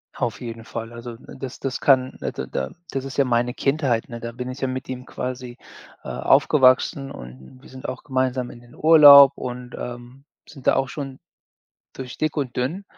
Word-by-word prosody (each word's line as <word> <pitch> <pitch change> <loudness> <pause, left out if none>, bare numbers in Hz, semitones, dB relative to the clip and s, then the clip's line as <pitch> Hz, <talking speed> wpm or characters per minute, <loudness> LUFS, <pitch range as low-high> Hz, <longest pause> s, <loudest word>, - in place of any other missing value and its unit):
Auf - - -3
jeden 115 -1 -7
Fall. 115 0 -6
Also, 120 0 -8
das 130 +1 -9
das 135 -2 -3
kann 130 -2 +3
da - - -3
da 65 0 -4 0.2
das 135 -1 -4
ist 135 - -7
ja 140 - +5
meine 120 -1 0
Kindheit, 135 -5 0
ne, 120 -1 -7
da 115 0 -6
bin 125 +1 -6
ich 130 - -7
ja 135 - -1
mit 130 0 -5
ihm 125 -1 -6
quasi, 125 -1 -6 0.5
äh, - - -7
aufgewachsen 135 0 +3
und 65 - -12
wir - - -16
sind 130 0 -9
auch 130 - -6
gemeinsam 130 -2 -1
in - - -12
den 120 0 -18
Urlaub 145 -3 +9
und, 125 0 -7
ähm, 120 +3 -9 0.2
sind 135 -4 -11
da - - +5
auch 135 - 0
schon 135 -1 -7 0.8
durch 130 -2 -8
dick 155 0 -1
und 135 -5 -3
dünn, 160 +11 -2
130 Hz, 195 wpm, -23 LUFS, 120-135 Hz, 0.8 s, Urlaub